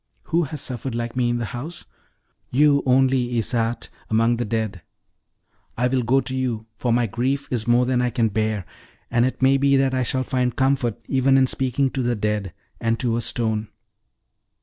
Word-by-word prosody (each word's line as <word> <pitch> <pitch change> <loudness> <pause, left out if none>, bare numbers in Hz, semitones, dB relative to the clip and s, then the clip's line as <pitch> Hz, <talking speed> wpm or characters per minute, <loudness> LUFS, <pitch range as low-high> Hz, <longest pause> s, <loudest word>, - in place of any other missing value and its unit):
Who 170 0 +1
has 150 +1 -5
suffered 125 -1 -4
like 120 0 -3
me 125 -1 +1
in 120 - 0
the 120 - -2
house? 135 +10 -7 0.6
You 145 +2 +4
only, 130 -1 +3
Isarte, 115 +1 0 0.2
among 115 +2 +2
the 120 - -2
dead. 110 -4 -2 1.0
I 125 +1 +2
will 130 0 +1
go 130 +3 +2
to 130 +1 -4
you, 120 -4 -2
for 120 +3 -1
my 120 +1 +3
grief 130 +6 -1
is 115 -3 -2
more 120 +1 +4
than 125 -1 +1
I 125 - +1
can 115 -2 +1
bear; 110 -2 -1 0.5
and 120 +1 +3
it 130 - -4
may 135 +1 +5
be 140 0 +3
that 135 -1 +2
I 130 - +1
shall 130 +1 0
find 125 -1 -1
comfort 130 -4 +1
even 135 0 +3
in 135 - +5
speaking 130 +1 0
to 135 - -2
the 120 -1 0
dead, 105 -2 -2 0.3
and 115 0 0
to 120 -2 0
a 120 - -1
stone. 110 -2 -1
125 Hz, 195 wpm, -23 LUFS, 115-130 Hz, 1.0 s, may